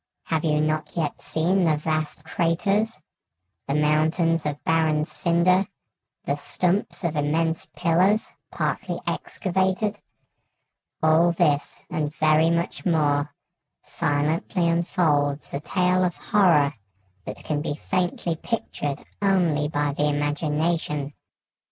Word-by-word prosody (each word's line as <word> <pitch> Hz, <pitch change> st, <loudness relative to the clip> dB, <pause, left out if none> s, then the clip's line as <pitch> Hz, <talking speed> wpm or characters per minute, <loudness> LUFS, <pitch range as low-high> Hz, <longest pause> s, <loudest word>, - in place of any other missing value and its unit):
Have 160 Hz, -2 st, -1 dB
you 150 Hz, -2 st, +2 dB
not 155 Hz, +2 st, -2 dB
yet 155 Hz, -3 st, -2 dB
seen 180 Hz, +4 st, +1 dB
the 155 Hz, -2 st, +2 dB
vast 155 Hz, 0 st, -2 dB
craters, 195 Hz, +5 st, 0 dB, 0.7 s
the 140 Hz, -, 0 dB
mountains 155 Hz, +2 st, +2 dB
of 145 Hz, -1 st, -5 dB
barren 160 Hz, -2 st, +2 dB
cinder, 180 Hz, +3 st, +2 dB, 0.6 s
the 140 Hz, -, -1 dB
stumps 180 Hz, +7 st, -1 dB
of 170 Hz, -2 st, -1 dB
immense 160 Hz, +2 st, 0 dB
pillars, 185 Hz, +5 st, +2 dB, 0.2 s
partly -, -, -2 dB
excavated? 190 Hz, +2 st, -1 dB, 1.0 s
All 160 Hz, +2 st, +5 dB
this, 150 Hz, -4 st, 0 dB
and 150 Hz, -1 st, -1 dB
very 155 Hz, +1 st, +4 dB
much 170 Hz, +1 st, -1 dB
more, 150 Hz, -4 st, +1 dB, 0.5 s
silently 155 Hz, +5 st, 0 dB
unfolds 155 Hz, -4 st, +1 dB
a 140 Hz, -, -1 dB
tale 180 Hz, +4 st, +1 dB
of 175 Hz, -1 st, 0 dB
horror 165 Hz, -9 st, +3 dB, 0.5 s
that -, -, -7 dB
can 150 Hz, -1 st, -2 dB
be 145 Hz, -1 st, -3 dB
faintly 175 Hz, +1 st, -1 dB
pictured 150 Hz, -8 st, -4 dB, 0.2 s
only 175 Hz, -7 st, +2 dB
by 145 Hz, -1 st, -1 dB
the 150 Hz, +1 st, +1 dB
imagination. 150 Hz, 0 st, -1 dB
160 Hz, 115 wpm, -24 LUFS, 150-175 Hz, 1.0 s, All